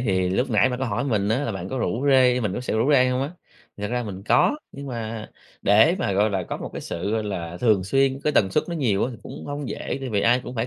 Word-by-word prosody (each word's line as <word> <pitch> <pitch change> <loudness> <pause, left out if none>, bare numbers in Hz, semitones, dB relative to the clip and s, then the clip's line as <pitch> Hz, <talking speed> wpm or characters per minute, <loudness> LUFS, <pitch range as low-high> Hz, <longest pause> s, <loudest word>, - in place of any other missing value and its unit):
thì 95 -6 +1
lúc 125 +8 0
nãy 115 +3 +4
bạn 125 - -3
có 130 - -1
hỏi 115 +2 -1
mình 105 -7 0
á 110 +4 +2
là 115 - -2
bạn 95 -1 -5
có 130 - -3
rủ 125 +3 -1
rê 125 -1 +5
mình 105 -5 -1
có - - -3
sợ 125 - -3
rủ 120 +7 +2
rê 130 -2 +5
hông 125 +1 0
á? 140 - -3 0.5
Thật 105 0 -4
ra 125 0 -1
mình 100 -4 -7
có, 290 - +3 0.2
nhưng 140 0 -8
mà 115 -3 -5 0.3
để 110 - +5
mà, 100 - 0
gọi 105 +3 +2
là, 95 -2 -1
có - - -5
một - - -7
cái - - -5
sự, 90 +5 -4
gọi 110 -1 0
là, 85 -4 -4
thường 105 -6 +3
xuyên, 135 +5 +1
cái 150 - +2
tần 95 -8 +3
suất 150 - +1
nó 170 - -3
nhiều 115 -11 +1
á 130 - -2
thì 120 - -8
cũng - - -9
hông 145 -2 -4
dễ - - -4
vì 100 - +2
ai 120 +2 +3
cũng 125 - -7
phải 115 0 -1
115 Hz, 295 wpm, -24 LUFS, 100-130 Hz, 0.5 s, rê